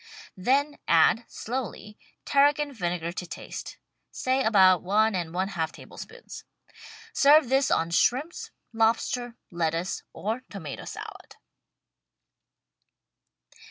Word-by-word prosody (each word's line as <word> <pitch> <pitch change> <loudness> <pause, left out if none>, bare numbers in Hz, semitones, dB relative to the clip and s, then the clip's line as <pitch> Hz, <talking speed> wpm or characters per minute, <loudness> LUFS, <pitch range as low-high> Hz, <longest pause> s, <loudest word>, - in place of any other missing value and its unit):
Then 275 +9 +1
add, 195 +8 +4
slowly. 215 -3 -6 0.3
Tarragon 285 +1 +3
vinegar 175 -5 -2
to 180 0 -6
taste 175 - -8 0.2
— - - -51
say 260 +1 0
about 190 -5 +5
one 215 +4 +2
and 175 -3 -3
one 185 +3 -1
half 160 -4 -2
tablespoons. - - -11 0.7
Serve 290 -1 +5
this 270 +1 +3
on 165 +1 +1
shrimps, 265 - +1 0.2
lobster, 230 +2 0 0.2
lettuce 170 +1 -1
or 220 +5 -3
tomato - - -7
salad. - - -9
220 Hz, 105 wpm, -27 LUFS, 175-260 Hz, 0.7 s, about